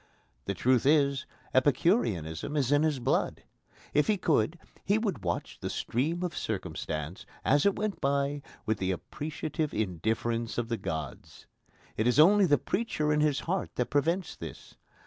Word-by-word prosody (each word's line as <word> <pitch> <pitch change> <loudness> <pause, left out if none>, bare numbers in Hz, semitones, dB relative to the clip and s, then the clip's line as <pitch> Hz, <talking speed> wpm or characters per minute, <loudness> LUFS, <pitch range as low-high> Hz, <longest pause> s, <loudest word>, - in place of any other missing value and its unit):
The 100 - -2
truth 125 +6 +2
is, 140 -3 +3 0.3
Epicureanism 130 - +1
is 135 -2 +1
in 145 0 +5
his 155 -3 +2
blood. 125 - 0 0.5
If 150 - +3
he 215 - +3
could, 160 - +1 0.3
he 200 +2 +2
would 200 - -2
watch 85 -1 -3
the - - -4
stream 160 +9 -1
of 175 -1 -3
circumstance, 80 -4 -4 0.2
as 145 +6 +4
it 200 - +2
went 210 0 -3
by, 140 +1 0 0.2
with 110 -1 0
the 95 - -1
appreciative 150 - -3
indifference 110 +4 -1
of 120 -1 -1
the 115 - 0
gods. 80 -5 -6 0.5
It 110 - +2
is 125 - +3
only 195 +4 +7
the 145 -2 +5
preacher 155 -8 -1
in 150 - +2
his 150 -2 +2
heart 185 +2 -2
that 125 - -1
prevents 165 +5 +1
this. - - -9
140 Hz, 160 wpm, -29 LUFS, 110-160 Hz, 0.5 s, only